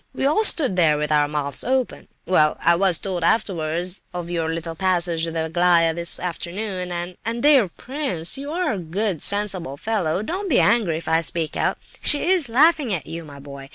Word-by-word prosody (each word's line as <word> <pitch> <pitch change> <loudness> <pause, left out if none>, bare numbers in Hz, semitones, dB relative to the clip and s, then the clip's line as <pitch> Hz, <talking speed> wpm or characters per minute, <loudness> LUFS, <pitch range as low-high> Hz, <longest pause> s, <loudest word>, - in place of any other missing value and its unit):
We - - -1
all 310 +10 +2
stood 285 - +5
there 155 -4 +3
with 150 0 -3
our 150 -1 +3
mouths 145 -1 -4
open. 260 0 -2 0.2
Well, 155 -4 +2
I 170 - +4
was 180 -1 +3
told 180 -2 -4
afterwards 175 -2 -1
of 175 -1 -5
your 165 -2 -2
little 165 0 -5
passage 170 -2 0
with 165 - -5
Aglaya 165 +1 +2
this 170 +1 -2
afternoon, 180 +1 -5
and—and—dear 225 +9 +1
prince—you 270 - -1
are 360 +2 -1
a 200 - -4
good, 180 +1 -2
sensible 195 -8 0
fellow, 190 -2 -2
don't 375 - -4
be 265 - +4
angry 205 -7 +2
if 165 - -8
I 160 +1 +2
speak 165 -1 -1
out—she 290 - 0
is 345 -9 +3
laughing 295 +1 +3
at 165 -8 -2
you, 165 +2 -7
my 145 -2 -12
boy! 140 -1 -11
175 Hz, 180 wpm, -21 LUFS, 165-220 Hz, 0.2 s, stood